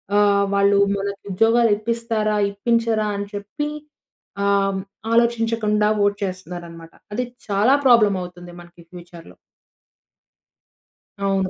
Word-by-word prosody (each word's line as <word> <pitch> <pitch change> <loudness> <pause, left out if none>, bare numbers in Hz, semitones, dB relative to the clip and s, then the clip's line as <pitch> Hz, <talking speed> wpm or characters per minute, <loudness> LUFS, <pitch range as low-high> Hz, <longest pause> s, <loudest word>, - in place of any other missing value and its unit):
ఆహ్, 205 -1 +4
వాళ్ళు 200 0 +3 0.2
మనకు 200 0 -4
ఉద్యోగాలు 225 +4 +3
ఇప్పిస్తారా? 225 -1 -1 0.2
ఇప్పించరా? 225 +1 0
అని 200 0 -3
చెప్పి 205 +9 -4 0.8
ఆహ్, 195 -1 +1 0.3
ఆలోచించకుండా 225 -2 +1 0.2
ఓట్ 205 0 0
చేస్తున్నారనమాట. 175 -3 -7 0.2
అది 250 +4 -1 0.2
చాలా 210 +6 +3
ప్రాబ్లమ్ 220 -6 +5
అవుతుంది. 175 0 -11
మనకి 175 0 -17
ఫ్యూచర్‌లో 175 -1 -13 1.9
అవును. 195 -1 0
200 Hz, 100 wpm, -21 LUFS, 190-225 Hz, 1.9 s, ప్రాబ్లమ్